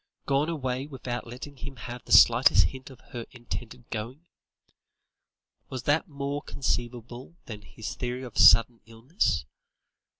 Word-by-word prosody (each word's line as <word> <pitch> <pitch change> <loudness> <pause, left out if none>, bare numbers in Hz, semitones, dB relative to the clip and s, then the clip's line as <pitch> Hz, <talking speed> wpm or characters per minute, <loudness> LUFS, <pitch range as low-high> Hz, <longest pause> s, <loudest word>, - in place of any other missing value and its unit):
Gone 140 +3 +1
away 130 -4 -3
without 125 -4 -5
letting 130 +4 -9
him 135 +2 -8
have 120 +1 -8
the - - -11
slightest 120 +3 +7
hint 130 0 -10
of 130 - -14
her 120 -2 -6
intended 120 0 -8
going? 120 +8 -6 1.4
Was 130 -2 -5
that 150 +8 +1
more 140 -1 -4
conceivable 120 0 -4
than 105 -3 -8
his 105 +2 -7
theory 125 +1 -4
of 120 -4 -9
sudden 115 0 +6
illness? 115 - -1
125 Hz, 135 wpm, -27 LUFS, 120-140 Hz, 1.4 s, slightest